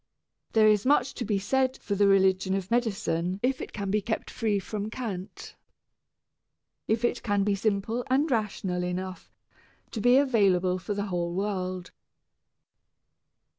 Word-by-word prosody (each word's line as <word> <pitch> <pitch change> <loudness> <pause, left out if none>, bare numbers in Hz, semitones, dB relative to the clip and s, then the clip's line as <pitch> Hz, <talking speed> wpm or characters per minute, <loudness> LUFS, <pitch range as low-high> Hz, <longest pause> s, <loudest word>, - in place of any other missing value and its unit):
There 220 -1 +5
is 210 -1 +4
much 270 -1 +2
to 245 - -4
be 210 -3 0
said 260 +6 0
for 205 - -4
the 200 0 +3
religion 190 -1 +3
of 195 0 -4
medicine 195 -6 0
if 260 +1 +1
it - - -6
can 200 -2 -4
be 210 +1 +2
kept 220 +1 -3
free 220 -4 0
from 205 +2 -4
cant, 210 -6 -6 1.3
if 225 +2 +1
it 240 - -1
can 205 -3 +1
be 205 0 +1
simple 215 +3 -1
and 270 +3 +3
rational 195 -5 -1
enough 185 +1 -5 0.6
to 220 - -4
be 245 +3 +5
available 195 -9 +3
for 205 +2 -4
the 200 0 -2
whole 175 -3 -2
world. 185 -2 -3
205 Hz, 150 wpm, -27 LUFS, 190-230 Hz, 1.3 s, There